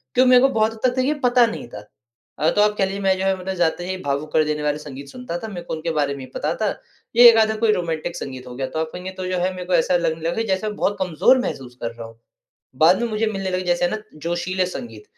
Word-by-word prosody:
क्यों 255 - +5
मेरे 250 -1 +7
को 270 - +5
बहुत 220 -3 +1
हद 255 - +4
तक 260 - -2
ये 295 - +2
पता 245 -1 +5
नहीं 225 - -5
था 105 - -8 0.6
अ, 155 - +3
तो 205 - +2
आप 210 0 +3
कह 195 - +3
लीजिए 195 +1 -4
मैं 190 -1 +2
जो 190 - -2 0.2
है 190 - -2
जाते 175 0 0
ही 185 0 -3
भावुक 145 +2 -2
कर 155 - +4
देने 150 0 -2
वाले 150 0 0
संगीत 140 -2 -9
सुनता 250 - -6
था, 220 - -6
मेरे 190 -5 -6
को - - -5
उनके 160 +1 -3
बारे 145 -3 0
में - - -9
ही - - -7
पता 155 +2 -1
था 215 -2 0 0.5
ये 240 +1 +10
1 230 - +5
आधा 220 0 +3
कोई 225 0 +3
रोमांटिक 170 -2 -3
संगीत 130 -6 -7
हो 125 - -8
गया 130 +1 -3
तो 145 +5 -4
आप 160 0 -2
कहेंगे 180 +1 -6
तो 185 - -4
जो 185 0 -1
है 180 +1 0
मेरे 180 -1 -7
को 180 - -2
ऐसा 175 +1 +3
लगने 160 -1 -1
लगा 175 +6 -1
जैसे 215 +3 -2
बहुत 205 -1 -1
कमज़ोर 185 +7 +3
महसूस 130 - -5
कर 115 - -2
रहा 115 -1 -9
हूँ। 115 0 -17 0.6
बाद 180 +7 +6
में 235 - 0
मुझे 220 +1 0
मिलने 195 -3 -3
लगे 185 0 -1
जैसे 175 0 +2
ना 215 - -2 0.3
जोशीले 180 +2 -1
संगीत 115 -11 -7
180 Hz, 275 wpm, -22 LUFS, 155-210 Hz, 0.6 s, ये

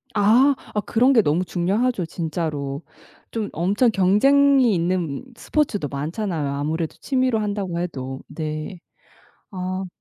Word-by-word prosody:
아 240 +7 +5 0.2
아 210 - +2
그런 250 +6 +3
게 225 - +6
너무 165 +2 +1
중요하죠 195 +4 0
진짜로. 155 -4 -3 0.5
좀 220 -3 -3
엄청 200 +8 +2
경쟁이 255 +6 +4
있는 170 - -1
스포츠도 220 - -1
많잖아요 155 - -3
아무래도 155 +3 -2
취미로 255 -4 +1
한다고 200 -5 -2
해도. 135 -6 -5
네. 155 +3 -5 0.7
아. 185 -1 -4
185 Hz, 265 characters per minute, -22 LUFS, 160-225 Hz, 0.7 s, 게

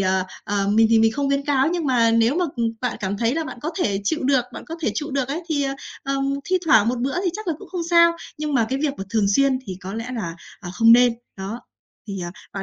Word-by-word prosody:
ờ, 185 -1 +1 0.2
ờ, 200 -1 0
mình 220 +2 +5
thì 225 - +6
mình 225 0 +4
không 280 +1 -1
khuyến 280 0 0
cáo, 280 0 +2
nhưng 345 -2 -1
mà 235 -3 +3
nếu 230 +4 +3
mà, 360 - +2
ừm, 230 -1 +1
bạn 250 - -2
cảm 200 0 -2
thấy 230 +4 +1
là 325 -1 -1
bạn 245 - -8
có 315 - -2
thể 200 - 0
chịu 315 +8 0
được, 260 -2 +2
bạn - - -8
có 330 - -6
thể 220 - +1
trụ 295 +5 -3
được 270 -1 -1
ấy, 320 +5 -3
thì, 290 -3 0
ờ, 270 0 -2 0.3
ờ, 275 0 -2 0.3
thi 370 0 +1
thoảng 225 -8 +5
một 245 0 -1
bữa 265 +3 -1
thì 360 - +2
chắc 430 +1 -7
là 320 - +1
cũng 400 - -12
không 355 -2 -3
sao, 335 0 +6 0.3
nhưng 300 -1 -2
mà 230 -3 +3
cái 265 +1 -1
việc 285 -2 0
mà 195 - -4
thường 215 -3 +2
xuyên 275 -2 +3
thì 185 -2 -5
có 190 +3 -6
lẽ 230 +3 -5
là, 170 -6 -4 0.2
ờ, 175 -3 -7
không 230 +2 +6
nên. 245 0 +6 0.2
Đó, 200 +5 -5 0.5
thì, 195 -2 -4
ờ, 175 0 -4 0.2
bạn 195 - -4
245 Hz, 280 wpm, -22 LUFS, 215-290 Hz, 0.5 s, thì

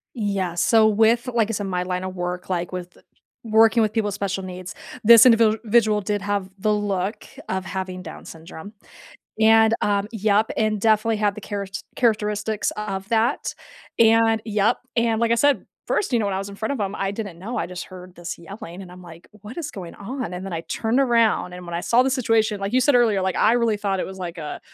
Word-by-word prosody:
Yeah, 200 -6 -2
so, 220 +5 +4
with 225 +3 +3
like, 235 -3 +1
I 225 - -2
said, 200 -1 -3
my 180 -1 -1
line 180 0 -3
of 185 0 -5
work, 180 0 -4
like, 175 -1 -2
with 180 -1 -7 0.5
working 225 +1 +4
with 215 -1 +1
people 220 -2 0
with 205 - -3
special 195 -1 -3
needs, 185 +1 -7 0.3
this 230 0 +9
individual 220 -2 +3
did 205 0 -2
have 200 -2 -2
the 210 +2 +1
look 205 0 -2 0.2
of 190 0 -2
having 185 -1 -5
Down - - -10
syndrome 165 +4 -11 0.7
and, 220 0 +5
um 205 0 0
Yep, 215 0 +1
and 215 -1 0
definitely 220 +1 +2
have 205 -1 +1
the 210 - -8
charets 200 -1 -5
characteristics 210 -2 0
of 195 -2 -4
that, 230 0 0 0.4
and, 225 -1 +4
yep, 215 +1 +1 0.2
and, 230 -1 +1
like 230 -1 +1
I - - +5
said, 285 +3 +2 0.2
1st, 375 - -1
you 240 - +3
know, 220 - 0
when 195 - -1
I - - -1
was 195 +1 -5
in 200 - -10
front 220 +6 -2
of 270 - -4
him, 200 0 -2
I 195 0 -2
didn't 200 -5 -6
know, 225 +7 -6
I - - -1
just 180 0 -7
heard 185 -1 -12
this 175 0 -6
yelling 195 0 -9
and 180 - -12
I'm, 180 0 -12
like, 170 -1 -14
"What 210 - -12
is 305 -3 -4
going 180 -7 -9
on?" 230 -3 -6
And 180 - -6
then 195 - -6
I 165 -1 -3
turned 225 +3 -1
around 230 -7 +2
and 180 0 -9
when 170 -1 -7
I 170 - -1
saw 235 +7 +3
the 265 - 0
situation, 225 -5 +1
like 195 +2 -3
you 255 - +3
said 255 +1 +4
earlier, 220 -5 +3
like, 190 0 -1
I 220 - +4
really 235 -3 +2
thought 195 -2 -2
it - - -2
was 190 0 -9
like 175 -2 -6
a 150 -2 -6
210 Hz, 225 wpm, -22 LUFS, 185-225 Hz, 0.7 s, this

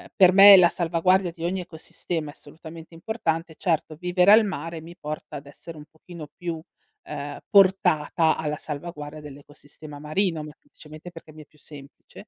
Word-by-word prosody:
per 185 -1 +6
me 195 +1 +9
la 180 -2 +6
salvaguardia 175 +2 0
di 165 0 -11
ogni 185 +2 -2
ecosistema 160 -2 -6
è - - -10
assolutamente 160 +3 -13
importante. 165 -3 -4
Certo, 160 -3 -2
vivere 180 +3 +2
al 220 0 +6
mare 165 -4 -6
mi 170 +2 -13
porta 155 -2 -8
ad 140 - -12
essere 160 +3 -12
un 150 - -11
pochino 160 -1 -12
più, 170 -2 -5 0.5
ehm, 145 0 -7
portata 170 -5 +3
alla 150 -1 -3
salvaguardia 150 -1 -8
dell'ecosistema 145 +1 -13
marino, 160 +2 -1
ma 150 - -9
semplicemente 155 +3 -14
perché 165 -2 -14
mi 155 - -13
è 150 - -15
più 150 - -29
semplice. 140 -2 -14
165 Hz, 165 wpm, -24 LUFS, 150-180 Hz, 0.5 s, me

